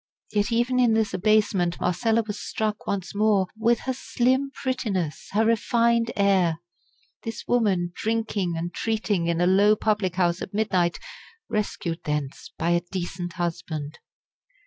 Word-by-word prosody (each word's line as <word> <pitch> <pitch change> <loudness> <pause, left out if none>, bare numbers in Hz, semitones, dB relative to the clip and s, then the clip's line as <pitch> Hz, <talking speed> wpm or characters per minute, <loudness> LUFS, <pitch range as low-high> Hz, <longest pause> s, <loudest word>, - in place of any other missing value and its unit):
Yet 205 0 0
even 240 +2 +2
in 240 -3 +4
this 220 -3 +1
abasement 195 -3 +2
Marcella 225 +6 +1
was 210 -1 -5
struck 215 -1 -3
once 190 -3 -2
more 205 -2 +3
with 230 +1 +2
her 260 - -2
slim 260 +2 +1
prettiness, 210 - -3
her 220 +2 +3
refined 230 +1 +2
air. 190 -5 +3 0.6
This 225 - -6
woman 195 -8 +2
drinking 215 -6 -1
and 170 +1 -4
treating 215 -6 -1
in 170 0 0
a 175 - +3
low 200 +3 +5
public 205 -4 0
house 175 -1 +1
at 195 - -6
midnight! 185 -5 +1 0.5
rescued 180 -5 -2
thence 150 -2 -3
by 170 - 0
a 175 0 +3
decent 175 -1 -4
husband! 165 -4 -4
205 Hz, 145 wpm, -25 LUFS, 175-225 Hz, 0.6 s, low